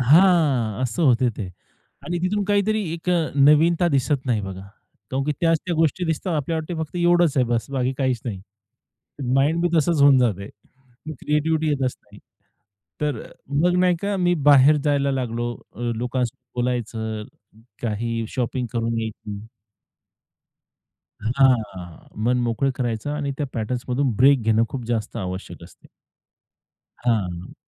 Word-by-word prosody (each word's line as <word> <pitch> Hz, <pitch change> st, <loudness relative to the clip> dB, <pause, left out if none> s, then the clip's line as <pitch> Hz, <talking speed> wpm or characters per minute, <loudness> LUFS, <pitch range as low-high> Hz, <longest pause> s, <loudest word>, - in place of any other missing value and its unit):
हां, 140 Hz, -, +4 dB
असं 130 Hz, +7 st, -1 dB
होत 130 Hz, -5 st, +4 dB
ते. 100 Hz, -, -4 dB, 0.6 s
आणि 175 Hz, 0 st, -2 dB
तिथून 200 Hz, +3 st, 0 dB
काहीतरी 205 Hz, +2 st, +1 dB
एक 170 Hz, +1 st, -6 dB
अ, 170 Hz, -3 st, +1 dB
नवीनता 160 Hz, +5 st, +4 dB
दिसत 140 Hz, -2 st, 0 dB
नाही 120 Hz, -4 st, +1 dB
बघा. 95 Hz, -1 st, -6 dB, 0.5 s
कारण 135 Hz, +1 st, -1 dB
की 150 Hz, -, 0 dB
त्याच 165 Hz, -2 st, +3 dB
त्या 175 Hz, -, -1 dB
गोष्टी 165 Hz, +3 st, +1 dB
दिसतात. 165 Hz, +1 st, -2 dB
आपल्याला 155 Hz, +3 st, -1 dB
वाटते 160 Hz, +3 st, -5 dB
फक्त 160 Hz, +3 st, -7 dB
एवढंच 175 Hz, -3 st, +3 dB
आहे 130 Hz, -, +4 dB
बस्स, 115 Hz, +1 st, -1 dB
बाकी 130 Hz, -1 st, 0 dB
काहीच 130 Hz, -4 st, 0 dB
नाही. 100 Hz, -6 st, -4 dB, 0.9 s
माइंड 150 Hz, +5 st, +2 dB
बी 175 Hz, -, +2 dB
तसचं 160 Hz, -1 st, +2 dB
होऊन 140 Hz, -2 st, +7 dB
जातंय, 105 Hz, -5 st, 0 dB, 0.7 s
क्रिएटिव्हिटी 155 Hz, +1 st, 0 dB
येतच 135 Hz, -4 st, 0 dB
नाही. -, -, -17 dB, 0.8 s
तर 150 Hz, -6 st, -1 dB
अ, -, -, -13 dB, 0.3 s
मग, 180 Hz, +1 st, +3 dB
नाही 180 Hz, -1 st, +3 dB
का, 200 Hz, 0 st, -1 dB
मी 175 Hz, -1 st, +2 dB, 0.2 s
बाहेर 140 Hz, +2 st, +7 dB
जायला 140 Hz, -1 st, +2 dB
लागलो 120 Hz, -2 st, -2 dB, 0.2 s
अ, -, -, -11 dB, 0.2 s
लोकांसोबत 125 Hz, 0 st, -2 dB, 0.2 s
बोलायचं. 110 Hz, -3 st, -2 dB, 0.6 s
काही 115 Hz, 0 st, -2 dB
शॉपिंग 125 Hz, +1 st, -2 dB
करून 115 Hz, -1 st, -1 dB
यायची. 110 Hz, -1 st, -7 dB, 1.7 s
हां. 110 Hz, -8 st, 0 dB, 0.2 s
मन 125 Hz, +2 st, +2 dB
मोकळं 125 Hz, +4 st, 0 dB
करायचं 120 Hz, 0 st, -2 dB
आणि 145 Hz, -1 st, -2 dB
त्या 145 Hz, -, -1 dB
पॅटर्न्समधून 125 Hz, +3 st, -1 dB
ब्रेक 135 Hz, +1 st, +5 dB
घेणं 110 Hz, 0 st, +3 dB
खूप 130 Hz, -3 st, -5 dB
जास्त 115 Hz, -2 st, -2 dB
आवश्यक 95 Hz, -3 st, -6 dB
असते. -, -, -18 dB, 1.2 s
हां. 90 Hz, -7 st, -1 dB
130 Hz, 145 wpm, -23 LUFS, 115-160 Hz, 1.7 s, होऊन